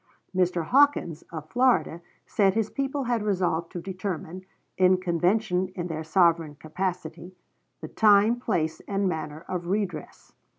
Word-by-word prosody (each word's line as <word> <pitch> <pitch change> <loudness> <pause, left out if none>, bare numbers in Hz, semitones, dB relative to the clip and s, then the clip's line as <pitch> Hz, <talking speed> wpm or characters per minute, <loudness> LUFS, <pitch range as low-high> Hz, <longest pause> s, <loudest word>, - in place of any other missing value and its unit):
Mr. 180 -2 +1
Hawkins, 265 - +3
of 155 -2 -7
Florida, 240 -10 +2 0.2
said 195 -2 +2
his 220 -1 0
people 275 0 -2
had 240 -2 0
resolved 180 -5 -1
to 175 - -5
determine, 185 -1 -5 0.3
in 185 0 +4
convention 180 +2 0
in 175 - -3
their 160 -1 -4
sovereign 165 -2 +2
capacity, 175 +2 -5 0.5
the - - -6
time, 215 +2 +4
place, 175 -10 -1
and 200 -1 0
manner 155 -2 -4
of 175 -2 -4
redress. 185 -5 -4
185 Hz, 135 wpm, -26 LUFS, 165-205 Hz, 0.5 s, in